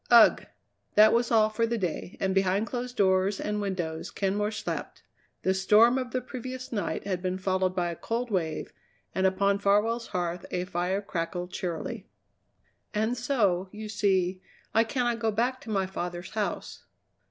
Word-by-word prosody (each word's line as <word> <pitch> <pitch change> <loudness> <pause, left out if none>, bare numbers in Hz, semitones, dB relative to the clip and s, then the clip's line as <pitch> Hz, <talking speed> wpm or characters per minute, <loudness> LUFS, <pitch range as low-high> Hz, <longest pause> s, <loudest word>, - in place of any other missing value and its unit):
"Ugh!" 235 -2 +7 0.5
That 215 +1 +7
was 235 0 +2
all 215 -2 +4
for 230 +2 +1
the 235 0 -1
day, 180 -2 -3
and 190 -1 +1
behind 195 +2 +2
closed 245 +1 -5
doors 190 0 +3
and 210 0 -2
windows 175 -5 -3
Kenmore 205 +1 0
slept. 215 - -5 0.4
The 190 - +3
storm 215 +6 +5
of 255 -1 -4
the 255 0 -2
previous 255 0 -7
night 205 -6 -2
had 185 -3 -2
been 185 0 -1
followed 185 -1 0
by 175 -1 0
a - - -5
cold 235 +6 -3
wave, 165 -5 -2 0.4
and 190 0 +3
upon 200 +1 +2
Farwell's 215 +4 +2
hearth 175 -2 -2
a 180 0 -2
fire 185 +3 -1
crackled 175 -1 -3
cheerily. 190 +5 -4 0.9
"And 220 +3 +1
so, 210 -8 +1
you 215 0 -7
see, 190 -3 +1 0.3
I 225 +1 +4
cannot 240 -1 0
go 225 -1 +1
back 245 +4 0
to - - -10
my 195 -3 +1
father's 175 -2 -5
house." 215 -1 -3
200 Hz, 165 wpm, -28 LUFS, 185-230 Hz, 0.9 s, Ugh